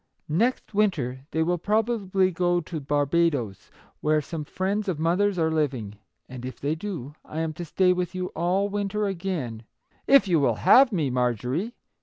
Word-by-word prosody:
Next 220 +10 0
winter 145 -11 0
they 160 - 0
will 175 +1 0
probably 205 -2 +1
go 175 0 +1
to 165 -1 -5
Barba 145 +4 +2
does, 110 - -5 0.3
where 155 0 +2
some 155 +1 -5
friends 200 +6 -2
of 185 -5 -1
mother's 180 +5 +1
are 160 -1 +1
living; 130 -10 -2 0.3
and 125 -1 -9
if 130 0 -7
they 145 +2 -1
do, 160 -6 -6
I 160 - -5
am 160 -1 -2
to 175 +3 -6
stay 180 +3 +3
with 180 0 -3
you 185 0 -3
all 180 +5 0
winter 205 +1 -2
again, 170 - -3 0.2
— - - -38
if 275 -7 +6
you 170 -4 +3
will 140 - +2
have 265 -1 +6
me, 155 -9 0
Mar 125 -1 +1
jorie 145 - -3
170 Hz, 185 wpm, -25 LUFS, 145-195 Hz, 0.3 s, if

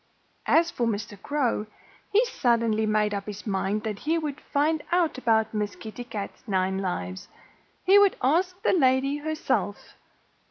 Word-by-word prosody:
As 335 +1 +4
for 235 - -1
Mr. 210 -1 -3
Crow, 255 -7 -1 0.4
he 440 +5 +4
suddenly 230 - +1
made 210 -1 +1
up 200 0 -4
his 210 0 -7
mind 200 +1 -1
that 215 -3 -4
he 320 +2 0
would 300 -3 -4
find 300 +2 +2
out 340 -6 +2
about 220 -3 +2
Miss 210 -1 -2
Kitty 225 +2 -8
Cat's 210 -4 -6
nine 190 -1 0
lives. 95 - -4 0.6
He 390 +2 +7
would 405 -1 +5
ask 355 +8 +1
that 365 - +3
lady 265 +1 +3
herself. 310 +1 -2
235 Hz, 155 wpm, -26 LUFS, 210-310 Hz, 0.6 s, He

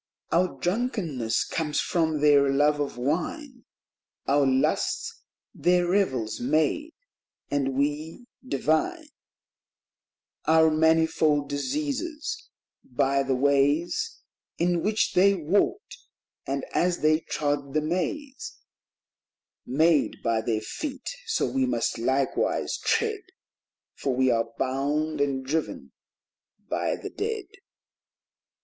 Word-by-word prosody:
" - - -43
Our 180 +1 +1
drunkenness 175 - -1
comes 150 -3 -1
from 160 -3 0
their 145 -2 +5
love 145 +2 +3
of 145 -3 -3
wine; 235 - -3 0.6
Our 140 0 +3
lusts 130 0 0 0.3
their 180 0 +2
revels 130 - 0
made; 155 - 0 0.6
and 135 -2 0
we 150 - -2 0.2
divine 260 - 0 1.4
Our 160 0 +5
manifold 160 -2 +2
diseases 300 - -3 0.3
by 135 +2 +1
the 135 -1 0
ways 145 - +1 0.3
In 175 0 +1
which 215 +3 +1
they 195 +2 +5
walked; 195 - 0 0.5
and - - -2
as 175 0 +1
they 155 +1 +4
trod 145 -3 -2
the 155 - +3
maze 270 - -3 1.1
Made 155 +4 +2
by 115 -1 +1
their 110 -1 -1
feet, 275 - -5 0.2
so 450 - +1
we 265 -1 0
must 250 - -1
likewise 130 +3 0
tread, 440 -3 +1 0.7
For 135 -2 -2
we 130 0 +3
are 115 -1 0
bound 145 +3 -1
and 135 -2 0
driven 155 +4 -3 0.8
by - - -1
the - - -8
dead." 430 -1 -3
155 Hz, 105 wpm, -26 LUFS, 140-205 Hz, 1.4 s, their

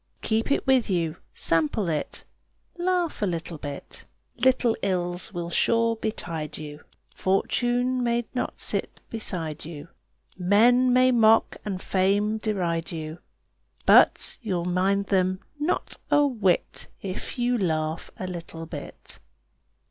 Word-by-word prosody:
Keep 220 +3 0
it - - +1
with 260 -4 +3
you, 170 -3 0 0.2
sample 165 +5 +2
it, 155 -3 -3 0.6
Laugh 355 -5 0
a 205 - +2
little 170 -2 -4
bit. 145 -1 -8 0.3
Little 250 -3 +3
ills 180 +1 -2
will 175 -2 -4
sure 230 +4 +2
betide 170 -8 -4
you, 150 -1 -8 0.3
Fortune 245 +6 +1
may 235 -1 +1
not 250 - -3
sit - - -2
beside 170 -8 -4
you, 155 0 -8 0.5
Men 235 +7 +4
may 255 +1 +5
mock 225 -2 +4
and 195 -3 -3
fame 200 +4 +1
deride 175 -7 -1
you, 160 0 -6 0.7
But - - +5
you'll 185 -7 -2
mind 190 +3 +1
them 185 -1 +1 0.2
not 300 +4 -1
a 290 0 +5
whit 215 -10 0 0.2
If 190 +6 -5
you 245 0 +1
laugh 160 -3 -1
a 185 - -4
little 170 -2 -7
bit. 160 - -9
195 Hz, 125 wpm, -26 LUFS, 170-235 Hz, 0.7 s, may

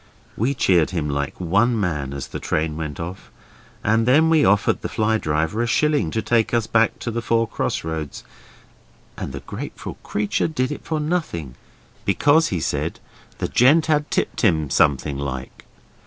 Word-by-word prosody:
We 130 +6 0
cheered 90 -9 +3
him 80 -5 -2
like 70 0 -3
one 105 +7 +2
man 75 -8 -2
as 70 -2 -6
the - - -5
train 80 0 -1
went 75 -3 -5
off, 85 +3 -7 0.5
and 110 +2 +2
then 155 +5 +5
we 160 -2 +5
offered 100 +1 +3
the - - -4
fly 110 0 +1
driver 80 +7 0
a 120 - 0
shilling 150 - +2
to 110 +6 -2
take 115 0 +2
us 115 -2 +1
back 115 0 +2
to 120 - -3
the 115 +1 -2
four 115 0 +1
cross - - -2
roads, 80 -3 -5 0.9
and - - -5
the 70 +1 -6
grateful - - -7
creature 105 +1 -1
did 130 -4 -1
it 150 - -6
for 160 -1 -2
nothing 150 - -2 0.5
because, 155 +3 +3
he 90 - -2
said, - - -2 0.4
the - - -2
gent 145 +6 +4
had 150 -1 +1
tipped - - -1
him 80 - +2
something 70 -1 +2
like. 65 -2 -6
105 Hz, 175 wpm, -22 LUFS, 80-125 Hz, 0.9 s, then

